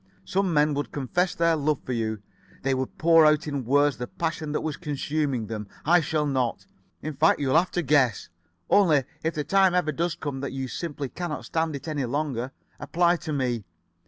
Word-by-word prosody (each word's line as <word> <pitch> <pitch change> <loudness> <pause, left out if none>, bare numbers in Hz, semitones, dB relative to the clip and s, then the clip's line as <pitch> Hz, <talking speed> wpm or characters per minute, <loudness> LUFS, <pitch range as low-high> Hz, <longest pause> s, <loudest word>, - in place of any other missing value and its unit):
Some 195 -1 0
men 150 -1 +3
would 145 +1 -3
confess 175 +7 -1
their 165 -1 +3
love 150 -1 0
for 130 - -3
you. 110 -3 -2 0.4
They 135 0 +1
would 130 0 -3
pour 165 0 +6
out 155 +1 +4
in 140 -4 -3
words 145 +3 +3
the 125 - -4
passion 160 -1 -3
that 150 - -1
was 155 -2 -3
consuming 145 -5 -2
them. 105 -1 -5 0.2
I 175 +3 +5
shall 155 -1 0
not. 130 -5 -1 0.4
In 155 - -3
fact, 150 +4 +3
you'll 135 -1 +1
have 175 +2 +4
to 175 - -1
guess. 135 - +2 0.4
Only, 160 -9 +4 0.2
if 160 +1 -1
the 150 - -1
time 190 +1 +3
ever 175 -4 +2
does 170 +3 -1
come 145 -5 -5
that 140 -1 -4
you 135 -1 -3
simply 145 +1 -4
cannot 170 +2 -5
stand 160 -2 -1
it 140 - -8
any 145 -4 -1
longer, 130 -1 -2 0.3
apply 175 +1 +2
to 160 - -6
me. 125 -6 -1
150 Hz, 200 wpm, -26 LUFS, 135-165 Hz, 0.4 s, pour